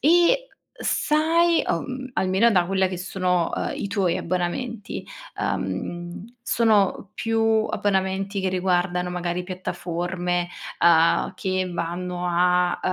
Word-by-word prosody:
e 350 - +4 0.3
sai, 330 +2 +2
uhm, 255 +9 -3
almeno 190 +5 +3
da 180 -5 +3
quella 190 0 +2
che 185 - -4
sono, 180 -2 0
uhm, - - -2
i 200 - -3
tuoi 195 -4 +1
abbonamenti, 190 +6 -3 0.4
uhm, 175 +6 -4
sono 210 -5 +2
più 225 0 0 0.3
abbonamenti 195 0 0
che 190 - +1
riguardano 180 -1 0
magari 180 0 -2
piattaforme, 175 -1 -3 0.3
uhm, 165 -1 +4
che 185 -1 -1
vanno 175 +1 -3
a, 180 0 +2
185 Hz, 110 wpm, -24 LUFS, 175-210 Hz, 0.4 s, e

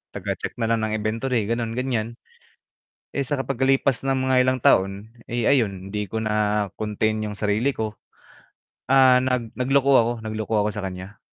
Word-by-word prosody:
taga-check - - -4
na 115 -1 -1
lang 115 - +2
ng 110 - -2
inventory 115 +2 -1
ganun, 115 +1 -2
gan'yan. 120 -3 -2 1.0
Eh, 140 - -1
sa 140 +1 -2
pag-kalipas 135 0 +1
ng 135 -1 0
mga 130 - +2
ilang 130 0 +1
taon, 100 0 +2 0.2
eh, 120 -1 -1
ayun, 100 -8 +1
'di 105 -2 -3
ko 110 - -2
na 105 -1 0
contain 110 0 -1
yung 105 -1 -5
sarili 105 +6 +1
ko, 110 -4 -4 1.0
ah, 130 -2 +6
nag 125 -3 -2
nagloko 135 +2 +2
ako, 120 -1 +4
nagloko 110 0 -3
ako 105 +1 +2
sa 105 - -4
kan'ya. 95 +2 -7
115 Hz, 165 wpm, -23 LUFS, 105-130 Hz, 1.0 s, ah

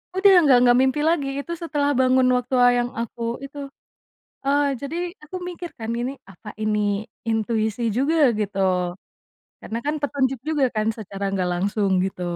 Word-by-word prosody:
Udah 390 +1 +6
nggak 280 -6 +6
nggak 245 0 +5
mimpi 265 +2 +1
lagi 300 -5 +1
itu 280 - -6
setelah 290 -3 0
bangun 255 0 +4
waktu 250 +1 -2
wa 245 - +7
yang 240 0 -1
aku 235 0 -5 0.2
itu, 275 +1 -12 0.9
eee, 285 +1 +3 0.2
jadi 280 +3 -5 0.3
aku 300 +5 -9
mikir 350 -1 -7
kan 225 0 -5
gini 245 +2 -2 0.2
apa 190 +3 -17
ini 215 0 +1 0.5
intuisi 220 0 -1 0.2
juga 280 +5 +2 0.2
gitu, 205 -1 -2 1.0
karena 230 - -5
kan 295 +1 0
petunjuk 270 -3 0
juga 300 -3 +2
kan 215 - +1
secara 200 -2 -6
enggak 190 -2 -1
langsung 200 +3 0
gitu. 190 -1 -4
250 Hz, 160 wpm, -23 LUFS, 215-285 Hz, 1.0 s, wa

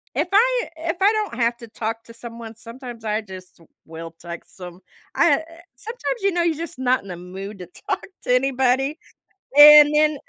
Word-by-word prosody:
If 300 +6 0
I - - +3
if 330 +1 -3
I 400 +2 +4
don't 430 - -2
have 235 0 +1
to 235 -1 -11
talk 225 +1 -5
to 230 - -14
someone, 230 -1 -10
sometimes 235 0 -11
I 215 0 -1
just 185 -4 -13 0.3
will 165 +1 -9
text 170 +2 -10
'em. 180 0 -10 0.3
I, - - +4
uh, - - 0
eh 330 0 -15 0.2
sometimes 465 - -5
you 395 - +2
know 350 0 0
you're 335 -2 0
just 330 -4 -7
not 255 0 +1
in 200 - -13
the 180 - -6
mood 190 +3 -9
to 180 - -8 0.2
talk - - -2 0.2
to 250 - +2
anybody, 265 +2 +1 0.6
and 295 0 +10
then 305 0 +4
e - - -7
250 Hz, 205 wpm, -22 LUFS, 215-320 Hz, 0.6 s, and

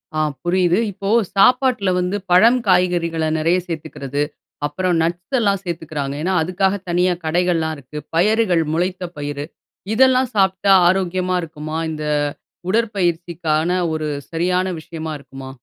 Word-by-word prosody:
ஆ - - 0 0.2
புரியுது. 180 +1 +2
இப்போ 195 +1 -5 0.3
சாப்பாட்ல 250 -1 +4
வந்து 180 +3 -1
பழம், 230 +8 +6
காய்கறிகள 175 -3 +2 0.2
நிறைய 165 +3 +2
சேத்துக்கிறது. 145 -4 -4 0.4
அப்பறம் 175 +4 0
நட்ஸ் 175 +9 -2
எல்லாம் 200 -4 +1
சேத்துக்கிறாங்க. 155 -5 -4
ஏனா, 185 +4 0
அதுக்காக 190 +3 0
தனியா 180 +1 +2
கடைகள்லாம் 165 -1 +1
இருக்கு. 140 +2 -11 0.2
பயறுகள், 190 -1 +3
முளைத்த 180 +1 -1
பயிறு. 145 0 -4 0.5
இதெல்லாம் 260 +1 +4
சாப்பிட்டா 190 0 +2 0.2
ஆரோக்கியமா 185 0 +1
இருக்குமா? 155 -1 -6
இந்த 155 -1 -5 0.6
உடற்பயிற்சிக்கான 175 -6 0 0.2
ஒரு 155 -1 -2 0.2
சரியான 180 +2 +1
விஷயமா 160 -1 -6
இருக்குமா? 135 -1 -10
175 Hz, 120 wpm, -20 LUFS, 160-190 Hz, 0.6 s, பழம்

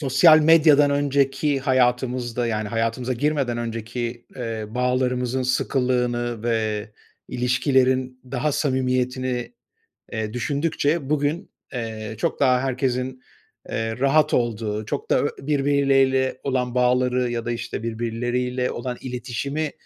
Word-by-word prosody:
Sosyal 155 +3 +6
medyadan 150 -2 +6
önceki 140 0 +1
hayatımızda, 125 -2 +1
yani 110 -2 -2
hayatımıza 115 +3 -1
girmeden 135 -2 0
önceki, 115 +1 -4
eee, 115 -3 -4
bağlarımızın 125 +1 0
sıkılığını 125 -2 0
ve 110 -2 -1 0.4
ilişkilerin 130 0 +1
daha 140 +3 0
samimiyetini, 130 -2 -1 0.6
eee, 110 0 -3
düşündükçe 145 +2 -1
bugün, 150 +4 -1 0.2
eee, 110 -3 -5
çok - - -1
daha 125 -2 +4
herkesin, 130 -1 -2 0.5
eee, 115 +1 -3
rahat 140 +3 +3
olduğu, 110 -3 -1
çok - - -4
da - - +3
birbiriyle 135 -2 +2
olan 125 -2 -1
bağları 125 0 +2
ya 115 -1 -3
da, 120 - -1
işte, 115 -1 -4
birbirleriyle 120 +2 -2
olan 125 +1 -4
iletişimi 130 +5 -3
125 Hz, 110 wpm, -23 LUFS, 120-135 Hz, 0.6 s, Sosyal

